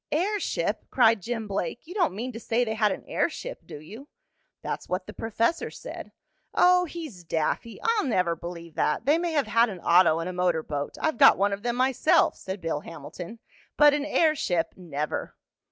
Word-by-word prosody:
"Airship!" 395 +6 -1
cried 230 -4 +4
Jim 225 +1 -4
Blake. 200 - -3
"You 345 - -9
don't 360 - +1
mean 245 +5 -4
to 230 - -8
say 235 +1 0
they 220 - -2
had 215 -2 +2
an - - -5
airship, - - -3
do - - -8
you?" 220 - -11 0.6
"That's - - -5
what 185 +1 -2
the - - -9
professor 230 +8 -1
said." - - -9 0.4
"Oh, 360 0 +5
he's 310 - -8
daffy! 165 +8 -2
I'll 455 -5 +2
never 180 -9 +1
believe 170 0 -8
that. 150 - 0
They 300 +4 +4
may 340 -1 -2
have 290 -3 +2
had 230 +1 +3
an 190 -4 -7
auto 170 -2 +5
and 165 +1 -3
a 185 - -4
motor 180 -3 +1
boat 145 -2 -4
I've 315 -1 -1
got 275 - +8
one 200 +1 +2
of 200 - -4
them 240 +1 -1
myself," 265 +7 +3
said 190 0 -7
Bill 165 -3 -2
Hamilton. 170 +6 -9 0.4
"But 295 -1 +7
an 290 0 -1
airship 285 - +1
never!" 155 -4 -4
225 Hz, 190 wpm, -26 LUFS, 175-295 Hz, 0.6 s, got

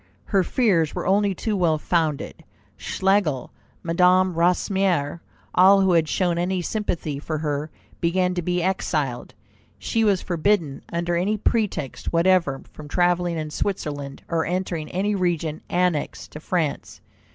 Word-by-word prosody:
Her 195 -3 +2
fears 175 - +1
were - - -3
only 200 +1 +2
too 215 +3 -2
well 170 -5 +2
founded. 155 -2 -1 0.3
Schlegel, 190 -9 0 0.3
Madame 180 +2 +3
Recamier, 175 -2 +1 0.3
all 195 +2 +6
who 190 -1 +3
had 160 -2 +3
shown 175 -2 +1
any 185 +1 0
sympathy 170 -8 -3
for 155 +1 -3
her, 150 0 -2 0.3
began 180 +2 +1
to 180 - -2
be 175 +1 -1
exiled. 155 -9 -2 0.4
She 225 - 0
was 200 -4 +2
forbidden 170 -4 0
under 170 +1 -1
any 195 +5 +1
pretext 205 - -1
whatever 170 -5 +2
from 150 - -10
travelling 175 +1 +1
in 155 -1 -4
Switzerland, 145 -7 -4
or 165 -1 0
entering 175 -3 -3
any 200 +3 0
region 170 -5 -1
annexed 180 -4 -1
to 150 - -8
France. 160 -2 -2
175 Hz, 140 wpm, -23 LUFS, 155-190 Hz, 0.4 s, all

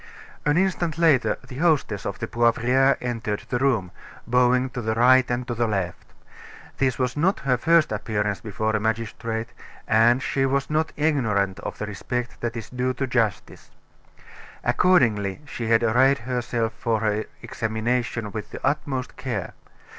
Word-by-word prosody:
An 145 +2 +3
instant 175 -4 0
later 160 -6 +3
the 125 - -9
hostess 150 - +1
of 100 - -4
the 115 - -3
Poivriere 120 +4 +2
entered 115 -4 -3
the 125 - 0
room, 120 -10 +1 0.3
bowing 125 +1 +2
to 125 - -4
the 110 -1 -1
right 125 +2 +5
and 120 0 -2
to 120 - -2
the 120 0 0
left. 95 -5 -3 0.7
This 130 -2 +1
was 125 -1 -1
not 175 +7 +1
her 130 -2 +2
first 165 +1 +3
appearance 105 -1 -2
before 110 0 -2
a - - +1
magistrate, 110 +1 -2 0.4
and 120 +4 +4
she 135 -1 +1
was 140 +2 -1
not 155 +1 +1
ignorant 110 -11 +1
of - - -6
the 105 - -3
respect 120 +4 -4
that 120 0 -3
is 115 - -8
due 125 0 -1
to 135 - -1
justice. 115 -6 -2 0.9
Accordingly, 120 - +2
she 120 -4 -5
had 115 +1 +3
arrayed 130 +5 +4
herself 120 -1 -2
for 115 -2 -1
her 105 0 0 0.2
examination 115 0 -2
with 110 -1 -6
the - - -8
utmost 135 -3 -2
care. 115 -9 -4
120 Hz, 160 wpm, -24 LUFS, 110-130 Hz, 0.9 s, right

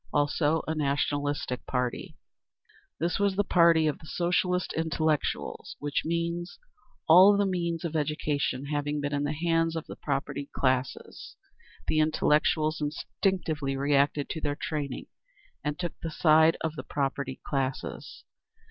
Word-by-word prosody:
Also 150 +2 +1
a 160 - 0
nationalistic 145 -2 -1
party. 125 +7 -2 0.8
This 170 +3 0
was 200 -1 +2
the 205 - +2
party 170 -4 +4
of 150 -2 0
the 160 - -14
Socialist 180 +1 0
intellectuals, 160 -1 -1
which 145 0 -1
means: 170 +1 -2 0.5
all 185 +5 +8
the 205 - +2
means 170 -3 -2
of 165 -1 -4
education 145 -3 -1
having 145 0 -2
been 145 0 -2
in 145 0 0
the 145 - -1
hands 165 +1 +1
of 160 - -4
the - - -8
propertied 140 0 -3
classes, 130 -1 -2 0.5
the 155 - +2
intellectuals 155 0 +2
instinctively 150 -2 -1
reacted 140 +1 +2
to 160 - -4
their 145 -1 -2
training, 145 -4 -3 0.6
and 150 0 -2
took 175 -2 -3
the 165 - -3
side 160 0 +4
of 160 -1 -2
the - - -6
propertied 135 -2 -3
classes. 135 -2 -4
155 Hz, 140 wpm, -28 LUFS, 145-165 Hz, 0.8 s, all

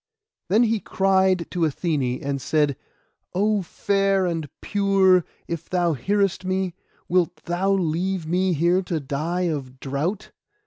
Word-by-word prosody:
Then 215 +6 +5
he 225 -1 +1
cried 190 -3 +2
to 180 - -3
Athené, 145 -5 0
and 140 -1 -2
said— 150 -2 +1 0.6
'Oh, 210 +2 +2
fair 195 +1 +1
and 165 -4 -2
pure, 195 -3 +3 0.2
if 170 -1 -5
thou 175 -2 +1
hearest 195 - 0
me, 185 -1 -1 0.3
wilt 180 -1 +2
thou 180 +3 0
leave 180 0 -1
me 180 +3 +1
here 170 +4 +2
to 175 -3 -2
die 155 +6 -2
of 140 -7 -3
drought? 150 +10 -3
180 Hz, 135 wpm, -23 LUFS, 160-190 Hz, 0.6 s, Then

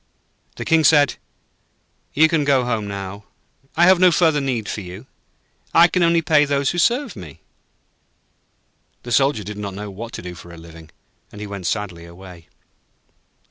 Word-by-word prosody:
The - - -6
King 160 -1 +3
said: 145 -2 +4 1.0
'You 160 +3 +6
can 160 -2 0
go 135 -3 +2
home 115 -4 -2
now. 100 0 -7 0.5
I 170 - +5
have 185 0 +5
no 185 -1 +6
further 160 -3 +2
need 125 -6 -2
for 105 - -4
you. 95 +5 -10 0.7
I 170 +1 +7
can 180 +1 -1
only 170 -1 +3
pay 155 -3 +4
those 140 -1 0
who 175 - -3
serve 245 - +1
me.' 85 -9 -11 1.6
The 120 - -8
Soldier 135 -3 +2
did 105 +2 -8
not 100 -2 -6
know 105 0 -7
what 115 +4 -8
to - - -7
do 90 0 -7
for 85 0 -13
a 85 - -12
living, 80 -1 -14 0.4
and 105 - -12
he 105 - -6
went 100 -3 -6
sadly 90 -4 -4
away. 85 -1 -14
115 Hz, 175 wpm, -20 LUFS, 95-155 Hz, 1.6 s, I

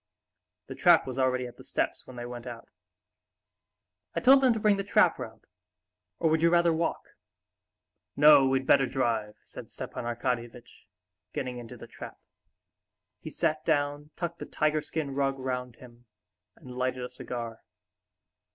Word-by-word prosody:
The - - -8
trap - - +5
was 130 0 -5
already 130 -1 +1
at 120 - -10
the - - -13
steps - - -2
when 130 - -11
they 120 0 -6
went 120 0 -8
out. 115 -1 -8 1.5
"I - - +1
told 270 +2 +6
them 260 -2 +5
to 225 - 0
bring 210 -1 +3
the 200 - -2
trap 200 - +3
round; - - -9 0.7
or 165 - +1
would 160 0 +2
you 170 - +5
rather 170 -1 +4
walk?" 165 +1 -2 1.1
"No, 145 -2 +7
we'd 130 0 +1
better 135 0 +4
drive," 115 -5 -1
said - - -11
Stepan - - -7
Arkadyevitch, 120 0 -4 0.5
getting 125 -1 -4
into 115 -2 -10
the - - -10
trap. - - -10 1.0
He - - -8
sat 155 -2 -1
down, 145 -1 0
tucked 170 -1 -4
the - - -7
tiger 155 0 0
skin 150 -3 -4
rug 135 0 0
round 125 -2 -4
him, 120 -1 -16 0.5
and 125 - -13
lighted 130 0 -2
a 125 - -5
cigar. 120 -2 -6
130 Hz, 160 wpm, -28 LUFS, 125-155 Hz, 1.5 s, No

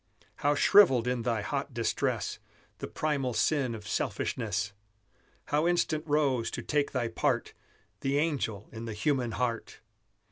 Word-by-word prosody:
How 145 +1 +2
shrivelled 135 - +6
in 125 -1 0
thy 115 -2 -1
hot 140 -1 -3
distress 115 -1 -1 0.4
The - - -4
primal 140 -6 -1
sin 135 -6 +1
of 105 -2 -9
selfishness! 105 -4 -1 0.8
How 150 +3 +2
instant 165 -3 +1
rose, 140 -6 +2
to - - -5
take 145 -1 0
thy 125 -3 0
part, 115 - 0 0.5
The 135 +1 0
angel 135 -10 -1
in 115 +1 -7
the 115 - -4
human 125 0 0
heart! 115 0 -2
125 Hz, 140 wpm, -30 LUFS, 115-145 Hz, 0.8 s, shrivelled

